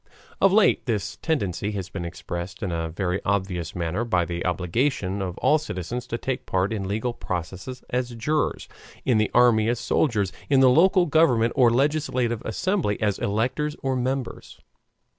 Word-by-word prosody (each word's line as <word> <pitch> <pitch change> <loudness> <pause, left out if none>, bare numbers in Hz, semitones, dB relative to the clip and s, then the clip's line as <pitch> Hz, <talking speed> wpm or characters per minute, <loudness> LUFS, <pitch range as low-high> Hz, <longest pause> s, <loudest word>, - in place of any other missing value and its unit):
Of 195 - +6
late 205 -8 +3
this 105 -5 -2
tendency 105 - -1
has 95 -2 -4
been 90 -3 -5
expressed 90 +3 -6
in 95 - -2
a 80 -1 -2
very 90 +2 -2
obvious 95 -4 -2
manner 90 +5 -1
by 90 -7 +1
the 85 0 -4
obligation 95 - -1
of 90 -2 -4
all 150 +4 +3
citizens 120 - -5
to 115 - -3
take 130 +1 -4
part 95 +3 0
in 100 -3 -3
legal 110 +5 -2
processes 95 +6 -5
as 125 -1 -2
jurors, 150 +7 -1 0.4
in 120 -4 +3
the 105 - +1
army 115 -2 +5
as 120 0 0
soldiers, 110 -6 +1 0.2
in 135 -2 +4
the 130 -1 +6
local 180 +5 +5
government, 135 -8 +3
or 125 -4 +5
legislative 130 -3 0
assembly, 170 - -1
as 105 -3 0
electors 125 +9 -1
or 135 -1 0
members. 130 0 -3
115 Hz, 165 wpm, -24 LUFS, 95-130 Hz, 0.4 s, Of